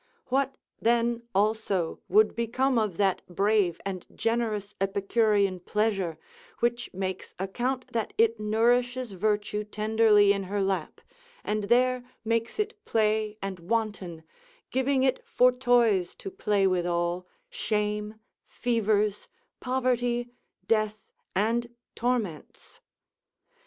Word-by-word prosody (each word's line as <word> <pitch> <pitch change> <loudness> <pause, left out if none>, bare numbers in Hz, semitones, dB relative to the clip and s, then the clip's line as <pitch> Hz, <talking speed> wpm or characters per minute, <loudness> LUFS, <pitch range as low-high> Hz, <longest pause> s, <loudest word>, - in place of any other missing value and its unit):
What 270 +1 +1 0.3
then, 235 0 +2
also, 200 -4 +1
would 430 +2 +4
become 240 +2 +1
of 210 -6 -1
that 195 -2 +2
brave 195 -1 +1
and 190 -3 -4
generous 220 -3 -1
Epicurean 200 0 +2
pleasure, 195 -3 -1 0.4
which 240 0 0
makes 185 0 -5
account 250 +7 -3
that 225 -2 -1
it 230 0 +3
nourishes 240 +3 +1
virtue 210 +2 -1
tenderly 210 -1 +4
in 200 -1 -3
her 200 +2 -2
lap, 190 -4 -2 0.4
and 210 -1 -1
there 250 +3 +3 0.2
makes 230 +1 0
it 425 0 -3
play 215 -1 +1
and 195 -2 -4
wanton, 185 -4 -2 0.5
giving 265 0 +2
it 260 -1 +1
for 250 +1 +4
toys 240 -7 +2
to 390 - -8
play 205 - +1
withal, 175 -1 0 0.2
shame, 210 0 -2 0.3
fevers, 215 -3 0 0.3
poverty, 245 -2 0 0.4
death, 215 -1 +1 0.4
and 230 +4 +1 0.2
torments? 230 -10 -3
215 Hz, 110 wpm, -27 LUFS, 195-240 Hz, 0.5 s, would